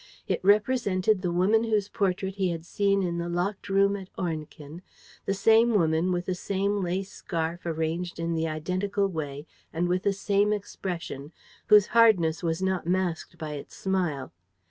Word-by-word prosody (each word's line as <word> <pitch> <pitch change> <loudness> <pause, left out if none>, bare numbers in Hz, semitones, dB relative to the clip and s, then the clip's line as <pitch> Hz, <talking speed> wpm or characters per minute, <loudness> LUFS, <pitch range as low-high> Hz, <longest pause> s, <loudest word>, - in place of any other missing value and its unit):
It - - -1
represented 205 -2 +2
the 180 -2 -1
woman 195 +6 +3
whose 215 -3 +1
portrait 190 -2 -1
he 190 -2 +1
had 165 -1 -4
seen 200 +1 +1
in 170 -1 -2
the 170 0 -3
locked 185 +4 -2
room 200 +1 +3
at 190 -2 -8
Ornequin, 155 -2 -5 0.5
the 195 - +2
same 225 +3 +4
woman, 165 -1 +2
with 175 0 -1
the 185 - -1
same 200 +2 -1
lace 185 +2 -2
scarf 170 +1 -4
arranged 165 +2 -2
in 165 0 -1
the 165 0 0
identical 185 +6 -1
way 145 -5 -5 0.3
and 170 +2 -1
with 180 +1 +1
the 200 - +1
same 200 +1 +1
expression, 175 -8 -5 0.4
whose 210 -2 +7
hardness 200 -9 +4
was 165 +1 -1
not 190 -3 -1
masked 175 -2 -1
by 155 -2 -5
its 145 -1 -8
smile. 175 -9 -2
185 Hz, 165 wpm, -27 LUFS, 165-200 Hz, 0.5 s, whose